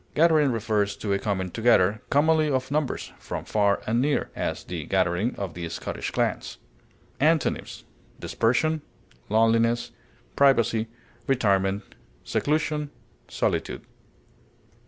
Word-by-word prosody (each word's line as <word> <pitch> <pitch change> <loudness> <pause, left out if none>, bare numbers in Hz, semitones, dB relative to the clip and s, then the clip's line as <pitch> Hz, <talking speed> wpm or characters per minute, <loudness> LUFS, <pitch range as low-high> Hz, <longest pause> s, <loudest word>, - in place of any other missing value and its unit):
Gathering 155 -3 +4
refers 105 -3 0
to 100 -2 -2
a 100 - +1
coming 95 -3 -2
together, 110 -3 +3
commonly 155 +1 +3
of 130 -1 -1
numbers, 150 -2 -2
from - - -6
far 100 -2 +1
and 115 +3 +1
near; 145 +2 0
as, - - -3
the - - -5
gathering 90 +8 +1
of 100 -3 -5
the 85 -1 -5
Scottish - - -4
clans. - - -2 0.6
Antonyms: 155 +1 +1 0.4
dispersion, 155 +7 +1 0.5
loneliness, 115 +2 +2 0.4
privacy, 115 -5 +3 0.4
retirement, 100 -6 +1 0.4
seclusion, 150 0 -1 0.4
solitude. - - -2
115 Hz, 110 wpm, -25 LUFS, 100-145 Hz, 0.6 s, Gathering